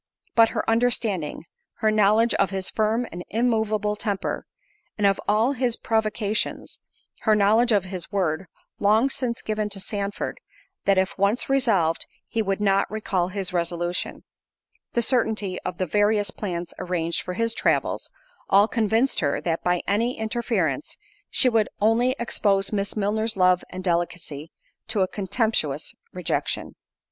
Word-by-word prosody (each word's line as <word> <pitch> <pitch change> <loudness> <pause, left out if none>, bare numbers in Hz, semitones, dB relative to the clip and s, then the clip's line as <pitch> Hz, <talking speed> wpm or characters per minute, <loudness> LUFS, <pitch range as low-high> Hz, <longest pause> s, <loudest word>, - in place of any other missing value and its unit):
But 230 -1 +6
her - - -3
understanding—her 220 -4 0
knowledge 215 +2 +4
of 195 - +2
his 190 -1 -3
firm 220 +3 +1
and 175 +1 -6
immoveable 220 -2 +1
temper; 205 -2 -3 0.5
and 210 - +1
of 195 -1 +3
all 220 +5 +3
his 250 -3 0
provocations—her 215 0 -2
knowledge 220 +4 +4
of 205 -4 +3
his 185 0 -4
word, 185 -3 -1 0.3
long 220 +6 +3
since 245 -4 -3
given 215 -1 -1
to 200 - -5
Sandford, 200 +1 -3 0.5
"That 195 -1 +4
if 190 0 +1
once 205 +7 +1
resolved, 200 -12 +2 0.2
he 225 - -1
would 195 -2 -1
not 195 -1 +2
recall 195 -4 -1
his 185 -1 -2
resolution"—the 175 +6 -4
certainty 220 -7 0
of 180 - -5
the 185 - 0
various 205 +1 +2
plans 175 -4 -4
arranged 175 -2 -1
for 180 - -5
his 230 +1 0
travels, - - 0 0.4
all 200 +2 +6
convinced 230 +3 +1
her, 145 -3 0
that 165 -1 -2
by 180 -1 +1
any 230 +5 +1
interference, 220 - -1 0.3
she 260 - +3
would 225 -4 +2
only 235 +4 +3
expose 200 -4 +1
Miss 200 +1 -1
Milner's 215 +1 0
love 180 -1 +4
and 185 0 -7
delicacy, 170 -3 -2 0.4
to 220 -3 +1
a 185 - +3
contemptuous 190 - -1 0.2
rejection. - - -2
205 Hz, 140 wpm, -24 LUFS, 185-225 Hz, 0.5 s, But